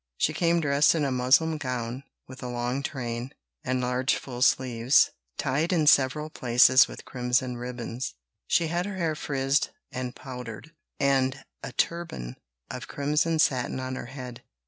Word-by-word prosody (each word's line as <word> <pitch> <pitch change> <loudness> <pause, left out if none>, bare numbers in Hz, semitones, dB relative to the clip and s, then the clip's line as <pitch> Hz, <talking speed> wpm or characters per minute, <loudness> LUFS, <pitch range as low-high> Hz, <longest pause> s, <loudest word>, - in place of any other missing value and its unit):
She 155 - +1
came 170 +1 +2
dressed 145 +1 +4
in 155 -3 +1
a 135 - -1
muslin 135 +6 +3
gown, 125 -2 -3 0.3
with 130 0 -11
a 125 - -5
long 120 +2 -2
train, 125 -2 -4 0.3
and 130 0 0
large 125 +1 +1
full 125 -2 -7
sleeves, 125 -1 +4 0.3
tied 145 +5 0
in 165 -4 +2
several 150 +1 +4
places 125 +1 +5
with - - -10
crimson 125 0 0
ribbons; 120 - -5 0.3
she 170 - +3
had 175 +3 -1
her 200 -2 -5
hair 165 -3 0
frizzed 140 0 0 0.2
and 125 -1 -4
powdered, 125 +1 -8 0.3
and 135 -1 +1 0.2
a - - -6
turban 65 - -2 0.3
of - - -6
crimson 150 +3 0
satin 130 -4 +1
on 130 0 -4
her 130 - -6
head. 125 -2 -8
130 Hz, 155 wpm, -27 LUFS, 125-150 Hz, 0.3 s, places